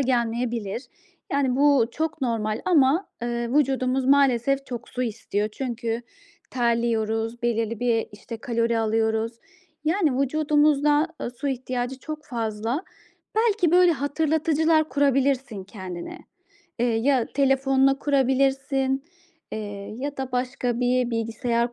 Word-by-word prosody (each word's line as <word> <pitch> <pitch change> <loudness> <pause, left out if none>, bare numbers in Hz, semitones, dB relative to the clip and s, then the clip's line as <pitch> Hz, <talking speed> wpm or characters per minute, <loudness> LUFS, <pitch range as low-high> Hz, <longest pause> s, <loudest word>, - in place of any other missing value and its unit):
gelmeyebilir. 235 -3 -1 0.5
Yani, 270 -3 +1
bu 280 -4 +4
çok 315 +3 -3
normal 220 -3 -1
ama, 320 0 +3 0.2
ııı, 240 +2 0
vücudumuz 265 -2 +1
maalesef 275 0 +3
çok 245 -1 -6
su 250 - -3
istiyor 210 -3 -2
çünkü 235 -2 -3 0.5
terliyoruz, 230 -1 0
belirli 230 -2 -1
bir, 235 -2 +1
işte, 225 +3 -8
kalori 230 -1 0
alıyoruz. 220 0 +1 0.5
Yani, 310 -5 +2
vücudumuzda 295 +1 +3
ı - - -3
su 250 +4 -4
ihtiyacı 255 -1 -3
çok 305 +2 -7
fazla. 230 - -2 0.5
Belki, 435 -6 +3
böyle, 355 0 +6
hatırlatıcılar 315 +2 +1
kurabilirsin 270 -5 +1
kendine. 185 -4 -7 0.6
Eee, 240 - +2
ya, 240 +2 +2
telefonuna 270 0 +3
kurabilirsin, 270 0 +1 0.5
eee, 205 -2 -6
ya 285 +2 -4
da 265 -1 -4
başka 250 -1 -1
bir 250 0 +2
bilgisayar 230 +1 -1
255 Hz, 115 wpm, -24 LUFS, 230-280 Hz, 0.6 s, böyle